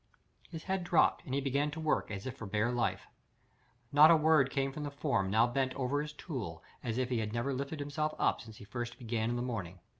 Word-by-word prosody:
His 165 Hz, -2 st, -7 dB
head 190 Hz, -1 st, -1 dB
dropped, 175 Hz, -1 st, +3 dB
and 130 Hz, -, -3 dB
he 140 Hz, -, +1 dB
began 140 Hz, +2 st, +1 dB
to 155 Hz, +2 st, -6 dB
work 155 Hz, -1 st, 0 dB
as 100 Hz, -2 st, -5 dB
if 130 Hz, -1 st, -4 dB
for 115 Hz, -6 st, -7 dB
bare 105 Hz, +4 st, +1 dB
life. 120 Hz, -1 st, -1 dB, 0.9 s
Not 150 Hz, +2 st, +8 dB
a 170 Hz, -, +8 dB
word 155 Hz, -3 st, +4 dB
came 135 Hz, 0 st, -1 dB
from 150 Hz, -, -6 dB
the 145 Hz, -, -3 dB
form 140 Hz, -9 st, 0 dB
now 110 Hz, +4 st, +4 dB
bent 130 Hz, +1 st, -1 dB
over 140 Hz, +2 st, 0 dB
his 150 Hz, 0 st, -5 dB
tool 125 Hz, -, -6 dB, 0.2 s
as 115 Hz, 0 st, -2 dB
if 130 Hz, -1 st, 0 dB
he 125 Hz, -3 st, 0 dB
had 110 Hz, -1 st, -3 dB
never 120 Hz, +4 st, -1 dB
lifted 140 Hz, +3 st, -4 dB
himself 150 Hz, +2 st, -2 dB
up -, -, +1 dB
since 110 Hz, -3 st, -12 dB
he 105 Hz, -, -11 dB
first 120 Hz, +2 st, -5 dB
began 115 Hz, -2 st, -2 dB
in 120 Hz, -, -1 dB
the 120 Hz, -, -1 dB
morning. 100 Hz, -8 st, -4 dB
130 Hz, 240 wpm, -32 LUFS, 115-145 Hz, 0.9 s, Not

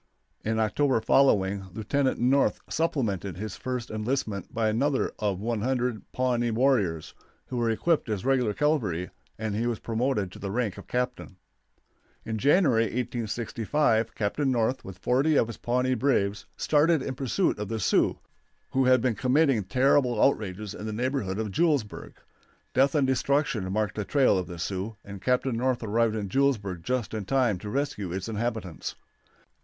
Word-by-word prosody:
In 110 Hz, +1 st, -1 dB
October 130 Hz, +4 st, +2 dB
following 100 Hz, -6 st, +3 dB
Lieutenant 130 Hz, +5 st, 0 dB
North 135 Hz, +3 st, +3 dB
supplemented 105 Hz, -, -1 dB
his 105 Hz, 0 st, -5 dB
first 125 Hz, -2 st, -4 dB
enlistment 110 Hz, -3 st, -2 dB
by 115 Hz, -1 st, 0 dB
another 130 Hz, +6 st, +1 dB
of 100 Hz, -3 st, -1 dB
100 120 Hz, +1 st, -2 dB
Pawnee 120 Hz, -2 st, 0 dB
warriors, 110 Hz, -, +1 dB, 0.4 s
who 125 Hz, -, -3 dB
were 120 Hz, -1 st, +1 dB
equipped 150 Hz, +4 st, +1 dB
as 105 Hz, +1 st, -2 dB
regular 125 Hz, -6 st, +2 dB
cavalry, 110 Hz, -, 0 dB, 0.3 s
and 110 Hz, -1 st, -3 dB
he 115 Hz, +3 st, 0 dB
was 120 Hz, -2 st, -1 dB
promoted 115 Hz, -4 st, -1 dB
to -, -, -11 dB
the 100 Hz, -, -4 dB
rank 105 Hz, -2 st, -2 dB
of -, -, -12 dB
captain. 125 Hz, -6 st, -3 dB, 0.9 s
In 110 Hz, -1 st, -3 dB
January, 140 Hz, -, +4 dB
1865, 115 Hz, +1 st, -1 dB
Captain 125 Hz, +7 st, 0 dB
North, 125 Hz, +1 st, 0 dB
with 95 Hz, -1 st, -9 dB
forty 135 Hz, +5 st, +2 dB
of -, -, +4 dB
his 115 Hz, -1 st, -8 dB
Pawnee 125 Hz, +2 st, 0 dB
braves, 105 Hz, -6 st, 0 dB
started 155 Hz, -1 st, +3 dB
in 135 Hz, -, -3 dB
pursuit 135 Hz, -, 0 dB
of 105 Hz, -, -3 dB
the 115 Hz, +1 st, -3 dB
Sioux, 95 Hz, -, +2 dB, 0.5 s
who 130 Hz, 0 st, +2 dB
had 130 Hz, -1 st, +5 dB
been 125 Hz, -2 st, +2 dB
committing 130 Hz, 0 st, +2 dB
terrible 125 Hz, +1 st, +2 dB
outrages 105 Hz, -5 st, 0 dB
in 110 Hz, -, -7 dB
the 110 Hz, -, -3 dB
neighborhood 120 Hz, -5 st, -1 dB
of 110 Hz, -2 st, -2 dB
Julesburg. 145 Hz, -, 0 dB, 0.6 s
Death 135 Hz, +2 st, +3 dB
and 145 Hz, -3 st, +3 dB
destruction 130 Hz, -6 st, 0 dB
marked 105 Hz, +1 st, 0 dB
the 105 Hz, -, -1 dB
trail 130 Hz, +3 st, +3 dB
of 90 Hz, -, -4 dB
the 85 Hz, -, -7 dB
Sioux, 95 Hz, +5 st, -3 dB
and 100 Hz, -2 st, -9 dB
Captain 125 Hz, 0 st, +1 dB
North 125 Hz, +1 st, 0 dB
arrived 110 Hz, +1 st, +1 dB
at 105 Hz, -2 st, -3 dB
Julesburg 105 Hz, -7 st, 0 dB
just 125 Hz, +1 st, -2 dB
in 110 Hz, -2 st, -3 dB
time 120 Hz, -4 st, +1 dB
to 105 Hz, -, -7 dB
rescue 110 Hz, -7 st, -2 dB
its 95 Hz, +3 st, -4 dB
inhabitants. 110 Hz, -5 st, -3 dB
115 Hz, 160 wpm, -27 LUFS, 105-130 Hz, 0.9 s, had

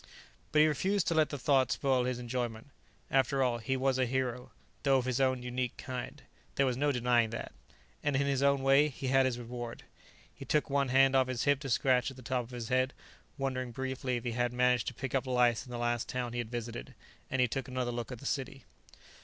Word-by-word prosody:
But 150 Hz, -, +5 dB
he 155 Hz, -, +6 dB
refused 190 Hz, +6 st, +1 dB
to -, -, +1 dB
let 155 Hz, -2 st, +3 dB
the 145 Hz, -, -4 dB
thought 135 Hz, -2 st, +2 dB
spoil 130 Hz, -3 st, +1 dB
his 125 Hz, -1 st, -1 dB
enjoyment. 120 Hz, 0 st, -4 dB, 0.4 s
After 135 Hz, 0 st, +3 dB
all, 120 Hz, -2 st, +1 dB
he 130 Hz, +4 st, -1 dB
was 130 Hz, 0 st, +1 dB
a 130 Hz, -, +2 dB
hero, 125 Hz, -1 st, -2 dB, 0.3 s
though 135 Hz, -2 st, +4 dB
of 125 Hz, -, -1 dB
his 130 Hz, +1 st, 0 dB
own 130 Hz, -1 st, +1 dB
unique 125 Hz, 0 st, -3 dB
kind; 130 Hz, -4 st, -6 dB, 0.3 s
there 140 Hz, -, +3 dB
was 130 Hz, -2 st, +1 dB
no 145 Hz, +3 st, +1 dB
denying 120 Hz, -3 st, +2 dB
that. 115 Hz, -, -5 dB, 0.5 s
And, 145 Hz, -2 st, 0 dB
in 140 Hz, +1 st, +2 dB
his 140 Hz, -1 st, 0 dB
own 140 Hz, -1 st, +3 dB
way, 135 Hz, +2 st, +5 dB
he 135 Hz, -2 st, -4 dB
had 135 Hz, 0 st, +4 dB
his 125 Hz, -2 st, -2 dB
reward. 120 Hz, 0 st, -7 dB, 0.5 s
He -, -, -10 dB
took 150 Hz, -2 st, 0 dB
one 140 Hz, -1 st, +2 dB
hand 135 Hz, +1 st, +4 dB
off 130 Hz, -1 st, +4 dB
his 125 Hz, -2 st, -2 dB
hip 140 Hz, -1 st, +3 dB
to 140 Hz, -1 st, -6 dB
scratch 125 Hz, +1 st, +2 dB
at 135 Hz, -, -11 dB
the 130 Hz, -, -11 dB
top 125 Hz, 0 st, -1 dB
of -, -, -16 dB
his 120 Hz, -3 st, -6 dB
head, 130 Hz, +1 st, +2 dB, 0.4 s
wondering 130 Hz, -2 st, -2 dB
briefly 130 Hz, 0 st, -3 dB
if 120 Hz, -, -6 dB
he 120 Hz, -, -2 dB
had 120 Hz, +1 st, 0 dB
managed 125 Hz, -1 st, +2 dB
to 120 Hz, -, -3 dB
pick 135 Hz, +1 st, -5 dB
up 135 Hz, -1 st, 0 dB
lice 125 Hz, -1 st, +2 dB
in -, -, -10 dB
the 120 Hz, -, -4 dB
last 120 Hz, -1 st, -1 dB
town 125 Hz, -2 st, -3 dB
he 120 Hz, -, -2 dB
had 120 Hz, -2 st, -3 dB
visited, 115 Hz, -, -6 dB, 0.3 s
and 130 Hz, -, -1 dB
he 125 Hz, -, +4 dB
took 130 Hz, +2 st, -3 dB
another 125 Hz, -1 st, -2 dB
look 120 Hz, +1 st, -4 dB
at 125 Hz, -, -5 dB
the 140 Hz, -, -12 dB
city. 135 Hz, -1 st, -3 dB
130 Hz, 235 wpm, -31 LUFS, 120-135 Hz, 0.5 s, he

